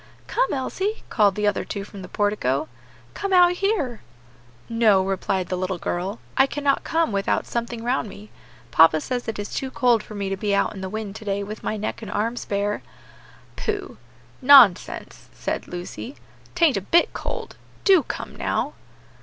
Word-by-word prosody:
"Come, - - 0
Elsie," 380 +10 -2
called 205 -4 +4
the 210 - -1
other 205 -1 +1
two 200 - -5
from 200 -1 -10
the 180 - -8
portico, 205 -11 0 0.5
"come 395 - -3
out 355 -1 +7
here." 355 - -1 0.7
"No," 220 -5 +3
replied 190 -1 -1
the 185 - 0
little 185 0 -2
girl, 185 +5 -3 0.2
"I 270 - +5
cannot 285 0 0
come 325 -4 +1
without 200 -1 0
something 235 -1 -4
round 245 -2 0
me. 210 +2 -12 0.4
Papa 160 -1 +6
says 245 - -3
it 225 - -3
is 205 0 -5
too 265 - -2
cold 245 -3 +3
for 215 - -11
me 200 -1 -2
to 195 - -1
be 200 +1 0
out - - +1
in 195 - -8
the 190 - -4
wind 215 -1 -5
to 220 - -11
day 200 0 -1
with 210 +2 -7
my 215 - -2
neck 215 +2 -4
and 220 - -7
arms 225 +4 -2
bare." 205 +1 -1 0.7
"Pooh! 410 -2 -3 0.4
nonsense!" 255 -9 +5
said - - -4
Lucy, 180 +9 -7 0.4
"'tain't 330 - +4
a - - -1
bit 335 - +3
cold; - - -5 0.3
do 380 -4 +6
come - - -6
now." - - -1
215 Hz, 180 wpm, -23 LUFS, 195-265 Hz, 0.7 s, out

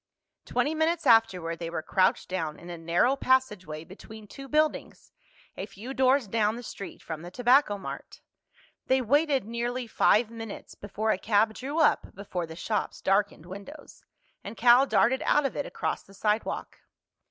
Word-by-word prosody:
Twenty 300 - 0
minutes 320 +1 0
afterward 190 -9 +3
they 165 -1 -4
were 165 -1 -4
crouched 185 +3 +1
down 160 -5 -3
in 175 +1 -10
a 170 - -6
narrow 175 +11 +2
passageway 210 - 0
between 215 +5 -12
two 275 +6 -10
buildings, 305 +2 -1 0.4
a 195 - -5
few 215 +6 -8
doors 265 -2 +3
down 215 +1 +1
the 240 - -8
street 200 -4 -9
from 160 -2 -6
the 175 - -8
Tobacco 245 +1 +3
Mart. 195 - -8 0.7
They 260 0 +3
waited 280 +1 +2
nearly 240 +2 -3
five 225 0 +3
minutes 225 -2 -8
before 215 +2 -2
a 185 - -1
cab 220 +1 +2
drew 275 +7 -5
up 315 - +2
before 180 -3 -4
the 160 - -9
shop's 210 +5 -3
darkened 195 -4 0
windows, 200 - -11 0.4
and 205 +3 -8
Cal 245 +3 +6
darted 260 +1 +3
out 295 -1 +3
of 270 - -2
it 285 - -3
across - - -3
the 195 - -18
sidewalk. 210 +3 -2
220 Hz, 165 wpm, -27 LUFS, 190-260 Hz, 0.7 s, Cal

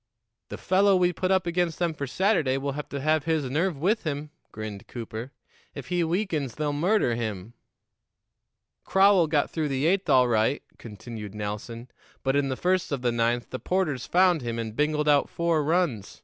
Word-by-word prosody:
"The - - -6
fellow 195 +1 +3
we 180 -1 +2
put 185 +2 -2
up 190 -2 +2
against 170 -1 0
them 170 -2 0
for 140 -2 -5
Saturday 165 - +1
will 140 +1 -2
have 150 +2 -6
to 140 - -4
have 155 +1 +1
his 160 -4 0
nerve 165 +2 0
with 200 +10 +1
him," 150 -1 -4 0.2
grinned 110 -2 -7
Cooper. 115 +1 -7 0.4
"If 140 0 -8
he 175 -1 +1
weakens, 165 - -1
they'll 150 -1 -1
murder 170 - +2
him." 110 -2 -4 1.3
"Crowell 190 -3 +4
got 150 -2 +1
through 155 -2 -1
the 135 0 -1
eighth 190 +3 +1
all 125 -1 +5
right," 115 +4 +1 0.2
continued 105 -1 -9
Nelson; 105 +3 -5 0.4
"but 135 0 +1
in 140 -1 +1
the 130 - -2
first 185 -1 0
of 135 -3 -2
the 120 - +2
ninth 120 +1 0
the 130 - -4
'Porters 165 -9 -1
found 180 -3 +3
him 115 -1 -4
and 110 -1 -4
bingled 150 +1 0
out 145 -1 +4
four 170 -2 0
runs. 150 - -1
145 Hz, 185 wpm, -26 LUFS, 120-175 Hz, 1.3 s, all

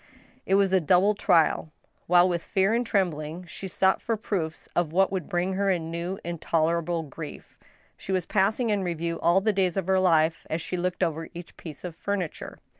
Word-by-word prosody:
It 195 - +3
was 195 -1 +3
a 190 - +5
double 185 +6 +4
trial. 165 -5 +2 0.4
While 175 +1 +6
with 175 -2 -1
fear 195 +4 +1
and 235 +1 +2
trembling 175 -5 -1
she 190 +3 -7
sought 190 +1 +2
for 225 -1 -1
proofs 175 -7 -3
of 175 -3 +1
what 190 +3 +3
would 185 -5 -3
bring 175 +2 0
her 200 +1 +1
a 185 - +3
new, 170 +3 -4
intolerable 170 0 0
grief, 155 +1 -9 0.4
she - - -7
was 185 -2 0
passing 215 +4 +1
in 205 -1 +1
review 170 -1 -2
all 175 +3 +3
the 215 +1 +1
days 185 -2 +1
of 190 - 0
her 190 0 +3
life 165 -3 +2
as 160 - -1
she 175 - -4
looked 180 +1 -1
over 165 -1 -2
each 175 0 -9
piece 155 -4 -10
of 175 -3 -6
furniture. 190 -2 -4
180 Hz, 195 wpm, -26 LUFS, 165-190 Hz, 0.4 s, While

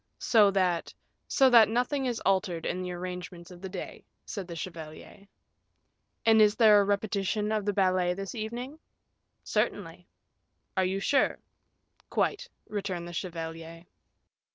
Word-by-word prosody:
"So 215 -4 +4
that 185 -3 0 0.2
" - - -49
"So 270 - +7
that 230 -3 +7
nothing 250 +4 0
is 240 -2 -2
altered 185 -4 0
in 185 - -2
the 180 0 -4
arrangements 180 0 -7
of 180 -1 -12
the 190 - -6
day," 185 -1 -7 0.2
said 200 -5 -6
the 170 - -7
chevalier. 165 +3 -9 1.0
"And 220 -1 +6
is 210 -1 +5
there 215 -3 +6
a - - +3
repetition 205 +1 -1
of 215 -2 -1
the 205 - +1
ballet 185 -2 +2
this 195 0 -6
evening?" 240 +6 -6 0.6
"Certainly." - - -2 0.7
"Are 190 -1 +2
you 190 +1 -1
sure?" 275 +7 +2 0.7
"Quite," - - -1 0.2
returned 190 -4 -4
the 175 - -8
chevalier. 165 -1 -6
195 Hz, 145 wpm, -28 LUFS, 180-215 Hz, 1.0 s, So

